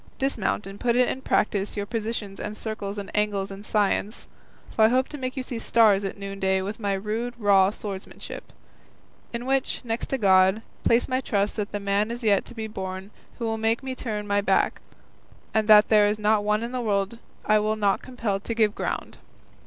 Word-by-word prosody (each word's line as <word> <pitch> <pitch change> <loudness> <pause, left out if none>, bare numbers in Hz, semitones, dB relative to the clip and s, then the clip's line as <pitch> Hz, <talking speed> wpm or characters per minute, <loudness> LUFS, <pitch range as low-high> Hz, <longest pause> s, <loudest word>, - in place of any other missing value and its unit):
Dismount 240 -7 -1
and 195 +1 -9
put 235 -1 +1
in 250 +1 +2
practice 210 -4 0
your 205 - -1
positions 215 -2 -4
and 210 0 -5
circles 210 -2 -5
and 200 -1 -7
angles 205 -2 0
and 195 +1 -9
science, 210 +1 0 0.5
for 220 - +6
I - - +5
hope 255 +2 +2
to 295 - -7
make 255 +1 -4
you 260 - -2
see 245 -2 -5
stars 215 -4 +4
at 195 - -4
noonday 195 -1 -1
with 205 +4 -5
my 200 -2 0
rude 220 +5 -3
raw 200 -3 +5
swordsmanship, 200 -2 -8 0.8
in 235 +1 -4
which, 270 0 0
next 230 -1 -3
to 270 - -1
God, 190 0 +4
I - - -6
place 235 +1 +3
my 255 0 0
trust 205 -5 0
that 205 -2 -2
the 205 - -3
man 200 +2 0
is 235 +1 -5
yet 205 -3 +3
to - - -11
be 220 -1 -4
born 190 -1 -6 0.3
who 235 - -3
will 225 0 -1
make 225 +3 +1
me 265 -1 -3
turn 215 -5 -4
my 205 0 +1
back, 205 - +1 0.7
and 220 -1 +1
that 210 -1 +7
there 210 -2 +6
is 210 +1 0
not 210 0 +2
one 210 +1 +1
in 235 - -4
the 255 -1 -2
world 205 0 -1 0.3
I 215 0 +4
will 215 +1 0
not 205 -2 +1
compel 225 -6 -3
to 230 +3 -4
give 215 -2 +3
ground." - - -4
210 Hz, 205 wpm, -25 LUFS, 200-230 Hz, 0.8 s, that